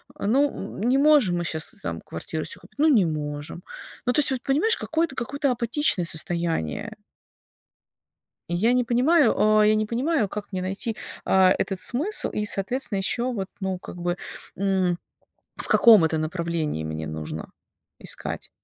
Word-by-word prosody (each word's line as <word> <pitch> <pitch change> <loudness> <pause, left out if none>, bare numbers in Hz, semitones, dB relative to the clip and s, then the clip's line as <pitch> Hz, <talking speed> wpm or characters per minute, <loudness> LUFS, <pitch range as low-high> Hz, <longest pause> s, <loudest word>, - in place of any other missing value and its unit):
А, - - -4
ну, 280 +6 +3 0.3
м - - -6
не 250 +4 +3
можем 280 -12 +4
мы 175 - -1
щас 160 -1 -1
там - - -4
квартиру - - -5
себе - - -7
купить, - - -19
ну 310 - +5
не 240 -10 +5
можем, 150 +1 -4 0.4
ну 245 - +2
то - - +2
есть, 295 - +5
вот 255 - -2
понимаешь, 320 +12 +2
какое-то 320 -3 -1
какое-то 280 +3 -1
апатичное 235 - 0
состояние. 165 - -1 1.6
Я 180 +8 +2
не 250 0 +2
понимаю, 255 +4 +3
о 215 0 +4
я 215 +1 +5
не 215 0 0
понимаю, 250 0 0
как 205 +1 -7
мне 185 -1 -2
найти, 195 +4 -3 0.3
а, 190 -1 +5
этот 190 -2 -2
смысл? 315 - +1
И 210 - -2
соответственно, 210 +2 -1
ещё 240 +6 0
вот, 195 -5 -4
ну 190 -1 -2
как 180 - -10
бы, 175 0 -2 0.4
м 190 -2 +1 0.6
в - - -5
каком 220 -7 +7
это 160 0 0
направлении 160 - -2
мне 80 0 -4
нужно 80 0 -6 0.5
искать. - - -4
205 Hz, 165 wpm, -24 LUFS, 175-250 Hz, 1.6 s, каком